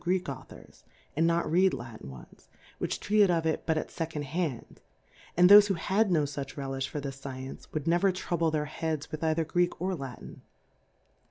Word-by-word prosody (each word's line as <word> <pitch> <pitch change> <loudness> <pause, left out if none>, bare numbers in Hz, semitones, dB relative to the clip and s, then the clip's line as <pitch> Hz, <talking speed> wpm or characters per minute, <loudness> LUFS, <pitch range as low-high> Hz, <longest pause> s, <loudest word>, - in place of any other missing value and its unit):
Greek 180 +1 +1
Authors^ 135 -5 -10 0.3
a?id 160 - +2
not 170 0 +2
read 185 +3 +4
Latin 115 - -9
ones^ 65 -2 -14 0.3
vohich - - -2
treated 210 -2 +3
of 165 -2 +1
It 160 - 0
hut 160 -1 +2
at - - -3
Second^ 160 -2 -4
ha?id\ 145 -4 -4 0.6
and 180 0 +7
tbofe 205 +1 +9
who 195 - 0
had 195 +5 +1
no 160 -4 +3
fuch 140 -1 -5
Relijh 135 -1 -3
for 150 - -5
this 135 -1 -6
Science^ 130 -1 -7
would 155 -2 -3
never 175 +3 +3
trouhle 170 -3 -1
their 150 -1 0
He.f^ds 155 0 -4
with 155 - -5
either 160 0 +1
Greek 175 +2 0
or 185 +2 -1
La 135 -7 -5
tin. - - -12
160 Hz, 190 wpm, -29 LUFS, 140-175 Hz, 0.6 s, tbofe